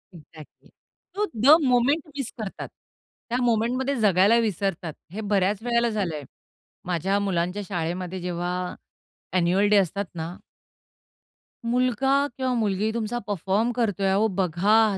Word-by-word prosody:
Exactly. 155 -1 -15 0.5
तो 415 +1 +1
the 265 +8 +7
moment 250 +6 +3
miss 275 -4 -4
करतात. 210 -3 -5 0.6
त्या 240 - 0
मोमेंटमध्ये 245 +4 +1
जगायला 200 +2 +4
विसरतात. 195 -6 -2 0.2
हे 220 - -4
बऱ्याच 200 -1 +1
वेळेला 235 -1 +2
झालंय 175 -9 -2 0.6
माझ्या 185 +3 0
मुलांच्या 185 0 -1
शाळेमध्ये 180 0 -3
जेव्हा 180 +1 -3 0.6
ॲन्युअल 185 +3 +3
डे 210 - +5
असतात 200 +2 +1
ना. 165 +2 -5 1.3
मुलगा 250 +2 +1 0.3
किंवा 260 -1 0
मुलगी 215 -1 0
तुमचा 235 +1 -2
परफॉर्म 205 +4 0
करतोय, 205 -5 0
अहो 200 +3 +3
बघा 195 +4 +3
205 Hz, 120 wpm, -25 LUFS, 180-235 Hz, 1.3 s, the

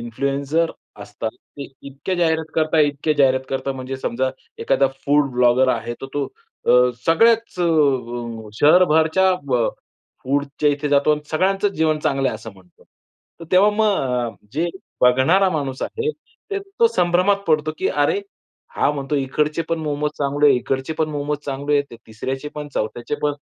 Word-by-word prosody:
Influencer 140 +7 -1 0.3
असतात, 105 +2 -5 0.3
ते 140 - -6 0.2
इतक्या 140 +7 -4
जाहिरात 160 -2 0
करता, 160 0 +1
इतके 145 +1 +1
जाहिरात 130 -2 +3
करता 135 0 -2
म्हणजे 130 0 -6
समजा 130 0 -1 0.3
एखादा 140 - +2 0.2
फूड 145 -1 +3
ब्लॉगर 125 +1 +3
आहे, 120 - -5
तर 135 - -5
तो 145 - -1 0.4
अ, - - +4 0.4
सगळ्याच 225 +7 +3 1.0
शहरभरच्या 160 +3 +4
ब 125 -4 +1 0.5
फूडच्या 140 +2 0
इथे 145 +1 -2
जातो 140 +1 +3
आणि 150 - -1
सगळ्यांचं 195 +5 +1
जीवन 155 -1 +1
चांगलं 135 -2 0
आहे - - -3
असं 110 +1 -8
म्हणतो. 95 -2 -22 0.6
तर - - -7
तेव्हा 195 +3 +6
मग 135 - 0 0.2
जे 160 +4 0 0.4
बघणारा 130 +11 +4
माणूस 140 -5 -3
आहे 450 0 -2 0.4
ते 400 - -1
तो 400 +4 +1
संभ्रमात 180 - +2
पडतो 155 -1 +1
की 380 - 0
"अरे, 420 -2 +1 0.6
हा - - +3
म्हणतो 140 0 -4
इकडचे 150 +4 0
पण 165 - -1
मोमोज 150 -1 -2
चांगले 145 +1 +2
आहेत, 135 -3 +5
इकडचे 130 +4 -3
पण 155 - +1
मोमोज 145 0 -2
चांगले 140 +1 -2
आहेत, 140 -4 -3
तिसऱ्याचे 130 +6 -5
पण, 150 -1 -6
चौथ्याचे 120 +5 -3
पण 150 0 +1
145 Hz, 155 wpm, -21 LUFS, 135-160 Hz, 1.0 s, तेव्हा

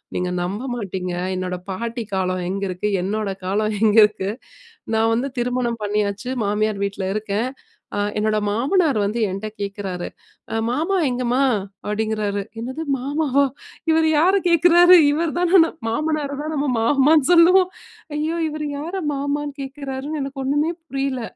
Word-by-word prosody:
நீங்க 180 0 -1
நம்ப 195 +5 -3
மாட்டீங்க, 190 -5 -4 0.2
என்னோட 185 0 -3 0.2
பாட்டி 230 +4 -4
காலம் 185 -1 -1
எங்க 195 +1 -3
இருக்கு, 185 +3 -2
என்னோட 210 +1 -2 0.2
காலம் 210 +3 0
எங்க 220 0 +4
இருக்கு. 205 -2 +1 0.6
நான் 225 +1 +3
வந்து 250 +4 -1
திருமணம் 240 -2 -1
பண்ணியாச்சு. 205 +2 -1 0.2
மாமியார் 210 0 0
வீட்ல 195 -1 -4
இருக்கேன். 215 +3 -2 0.5
ஆ - - 0 0.2
என்னோட 215 0 +1
மாமனார் 280 - +2
வந்து 210 +4 -1
என்ட்ட 195 +3 -4
கேட்கிறாரு, 200 -3 -4 0.5
"அ - - -1
மாமா 320 +10 0
எங்கம்மா?" 250 0 0 0.5
அப்படீங்கிறாரு. 210 -1 -1 0.2
என்னது 260 +7 -5 0.2
மாமாவா? 280 +1 +1 0.4
இவர் 320 0 +4
யாரை 370 +6 +4
கேட்குறாரு? 350 +1 +7 0.2
இவர் 320 +2 0
தான 355 +1 +5
ந - - +1 0.2
மாமனாரை 295 +4 -1
தான் 310 +1 -4
நம்ம 290 0 0
மாமான்னு 280 +4 +4
சொல்லுவோம். 360 +2 +6 0.5
ஐயோ! 310 +2 -1
இவர் 305 0 -4
யாரை 340 +6 -4
மாமான்னு 285 +1 -2
கேட்கிறார்ன்னு 275 +2 -5
எனக்கு 275 0 -5
ஒன்னுமே 290 +4 +1 0.2
புரியல. 270 -2 -2
250 Hz, 140 wpm, -21 LUFS, 210-300 Hz, 0.6 s, கேட்குறாரு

